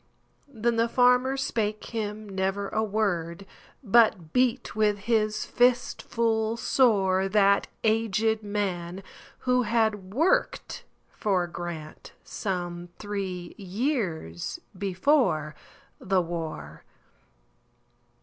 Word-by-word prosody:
Then 235 -3 -1
the 230 +1 +2
farmer 250 +2 +4
spake 215 -5 -2
him 215 -1 -4
never 195 +1 -2
a 220 - 0
word, 195 -4 -1 0.4
But 200 -7 +3
beat 250 0 +1
with 210 -1 +2
his 215 0 0
fist 245 0 +2
full 225 -1 0
soreThat 200 -4 +3 0.2
aged 220 0 +1
man, 195 -3 -3 0.4
who 250 0 +2
had 215 -4 0
worked 345 - 0 0.3
for 185 -4 0
GrantSome 175 +2 -6
three 190 -4 -5
years 190 - -2 0.2
before 185 - +1 0.5
the 190 0 +1
war. 160 - -5
205 Hz, 90 wpm, -27 LUFS, 185-230 Hz, 0.5 s, farmer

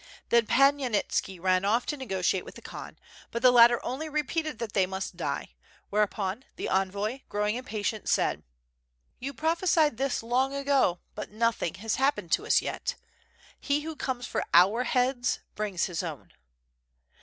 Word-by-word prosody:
Then 235 -2 +4
Pan 275 +1 +5
Yanitski 210 -6 -1
rode 185 +1 +2
off 225 +5 +2
to 295 - -2
negotiate 190 -8 -1
with - - -11
the - - -11
Khan, - - -9 0.3
but 235 +2 -4
the 250 - +8
latter 240 0 +7
only 285 +6 -3
repeated 305 -1 -2
that 225 -2 -5
they 190 -2 +3
must 190 -1 -5
die; 145 - -4 0.4
whereuppn 210 0 0
the - - -4
envoy, 200 +6 0
grow 210 0 -1
ing 210 - +1
impatient, 220 -4 -3
said: - - +1 0.8
"You 270 +2 -4
prophesied 320 -1 +2
this 270 -2 -1
long 260 +4 +1
ago 275 -10 +2
but 210 - -6
nothing 225 -5 0
has 215 +3 -2
happened 275 +2 0
to - - +1
us - - +4
yet, - - -3 0.6
he 285 +1 0
who 320 +1 -6
comes 255 -4 -3
for - - -2
our 200 +8 +5
heads 250 -1 +1
brings 205 -5 -1
his 175 -4 -3
own." 160 -6 -7
235 Hz, 165 wpm, -28 LUFS, 195-270 Hz, 0.8 s, the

